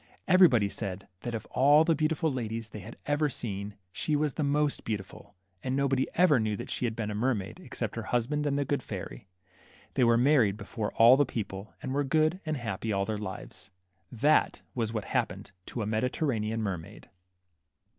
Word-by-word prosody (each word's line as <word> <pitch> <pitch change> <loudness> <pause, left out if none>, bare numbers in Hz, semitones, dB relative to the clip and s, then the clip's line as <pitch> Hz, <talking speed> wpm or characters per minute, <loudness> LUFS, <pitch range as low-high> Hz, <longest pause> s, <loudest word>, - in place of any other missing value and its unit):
Everybody 175 - +6
said 100 -2 -5
that 120 +2 -4
of 110 - -5
all 145 +4 +6
the 165 0 +3
beautiful 155 0 +1
ladies 115 -3 -4
they 105 - -7
had 110 +5 -10
ever 145 +1 +1
seen, 100 -5 -4 0.2
she 150 - -1
was 150 -2 +1
the - - -3
most 145 0 +1
beautiful; 105 -1 -6 0.3
and 130 0 -2
nobody 135 -1 +1
ever 175 -7 +5
knew 110 -2 -1
that - - -6
she - - -1
had 115 -2 -2
been 110 -2 -3
a - - -3
mermaid, 105 -3 -1
except - - -5
her - - -3
husband 145 +5 0
and 140 -1 +1
the 140 - 0
good 140 -2 0
fairy. 100 -2 -7 0.7
They - - +2
were 115 -1 +5
married 120 -6 +4
before 110 -1 -4
all 120 +3 +7
the 145 - +5
people, 100 -4 -5
and 130 - -3
were 145 +1 +1
good 155 +5 +2
and 155 -1 0
happy 115 -2 -3
all 100 -1 +1
their 110 -1 -3
Hves. 95 -2 -7 0.4
That 140 +6 +2
was 115 -3 -1
what 110 -3 -3
happened - - -2 0.2
to 115 - -3
a - - -2
Mediterranean 110 0 -1
mer 95 -5 -1
maid. 80 - -13
120 Hz, 195 wpm, -29 LUFS, 105-145 Hz, 0.7 s, all